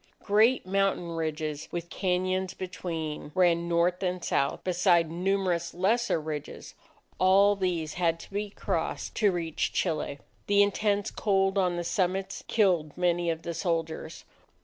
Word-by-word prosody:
Great 220 +4 +3
mountain 195 -2 0
ridges, 155 -2 -3
with 170 0 -5
cañons 185 0 -1
between, 165 -5 -5
ran 170 -2 +3
north 175 +1 +2
and 180 -1 -2
south, 140 - 0
beside 175 -3 +3
numerous 180 -1 -1
lesser 200 +2 +1
ridges; 150 -2 -6 0.5
all 195 +3 +5
these 175 -5 -2
had 165 -1 +2
to - - -12
be 205 +1 -3
crossed - - -3
to 210 -3 +3
reach 165 -3 -2
Chile. 155 -5 -1 0.3
The 205 0 +5
intense 205 0 0
cold 195 -2 +1
on 180 -3 +2
the 175 - -2
summits, 190 +1 -1
killed 175 -9 +1
many 175 -1 +1
of 165 0 -2
the 170 - -4
soldiers. 165 -1 -3
180 Hz, 140 wpm, -28 LUFS, 165-195 Hz, 0.5 s, all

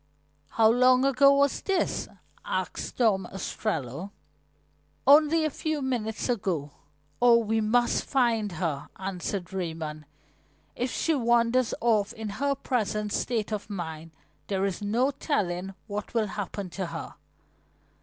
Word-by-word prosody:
"How 225 -1 +4
long 255 +3 +5
ago 275 +1 +6
was 280 0 +2
this?" 385 -2 0 0.4
asked - - -3
Tom 200 -7 +2
Ostrello. 190 - -3 1.0
"Only 305 +3 +6
a 310 - 0
few 315 +2 -2
minutes 225 -4 -2
ago. 185 - -1 0.5
Oh, 240 -1 +7
we 225 -1 +1
must 240 +3 +2
find 230 -7 +1
her," 155 -4 -3
answered 190 0 -4
Raymond. 160 -4 -4 0.7
"If 250 +1 -1
she 325 - +1
wanders 240 -1 +2
off 215 -3 +2
in 220 -1 -5
her 280 +7 0
present 215 -5 -1
state 225 -3 -1
of 210 0 -4
mind 165 -5 -5 0.4
there 195 -1 0
is 195 -1 -3
no 235 +7 +1
telling 195 - -2
what 210 +1 -6
will 220 -3 +1
happen 200 -2 -5
to 190 0 -3
her." 165 -1 -6
215 Hz, 130 wpm, -27 LUFS, 190-250 Hz, 1.0 s, Oh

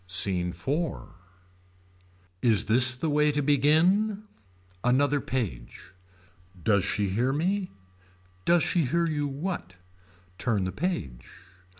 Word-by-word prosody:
SCENE 90 -2 +3
IV. 150 - -3 1.3
Is 115 -4 +3
this 125 +3 +4
the 145 - -2
way 150 0 +3
to 145 0 -1
begin. 170 +10 +2 0.6
Another 140 +3 +2
page. 90 - -5 0.7
Does 100 -1 +2
she 100 +2 -1
hear 120 +7 0
me. 185 +6 -1 0.7
Does 170 - +3
she 170 -4 +1
hear 170 +7 +1
you 150 -3 -1
what. 140 - -5 0.6
Turn 110 -6 0
the 95 - -2
page. 90 - -4
135 Hz, 110 wpm, -27 LUFS, 100-160 Hz, 1.3 s, this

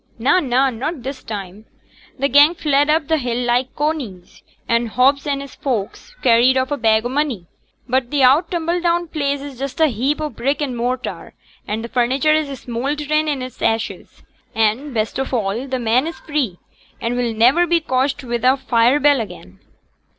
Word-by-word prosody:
'Na, 260 +10 +3
na, 265 -3 +2
not 260 +4 -4
this 270 +1 -6
time. 205 0 -7 0.5
T' 275 - +2
'gang 290 +5 +6
fled 290 -2 +1
up 310 -1 +2
t' 320 0 +2
hill 245 -4 -2
like 245 +2 0
coneys; 275 - -4 0.3
and 235 0 +1
Hobbs 270 +5 +2
and 280 -1 -1
his 280 - -11
folks 255 - -4
carried 250 +1 +5
off 260 +1 0
a 290 - 0
bag 220 -1 +2
o' - - -1
money; 265 - -1 0.4
but 255 -1 0
t' 285 -1 +1
oud 285 +7 +5
tumbledown 345 0 0
place 285 -3 -1
is 280 -3 -9
just 275 +2 -5
a 320 - +6
heap 265 +6 -1
o' 305 - -1
brick 270 +5 -1
and 280 -4 -2
mortar; 250 +2 -4 0.3
an' 220 +2 -3
t' - - -4
furniture 260 +5 +2
is 310 -2 0 0.2
smoulderin' 295 +5 -1
int' 255 -4 -4
ashes; 225 0 -2 0.3
and, 225 +6 +1
best 220 +1 -2
of 265 - -3
a', 225 +2 -1
t' 260 -1 -2
men 245 +4 +1
is 330 - -7
free, 280 - -2 0.4
and 235 +1 -2
will 245 -1 0
niver 250 +11 +4
be 340 0 +3
cotched 265 -2 -1
wi' 240 -1 -2
a 255 +3 +4
fire 250 +1 +2
bell 290 -3 +4
again.' 95 - -10
260 Hz, 185 wpm, -19 LUFS, 235-290 Hz, 0.5 s, gang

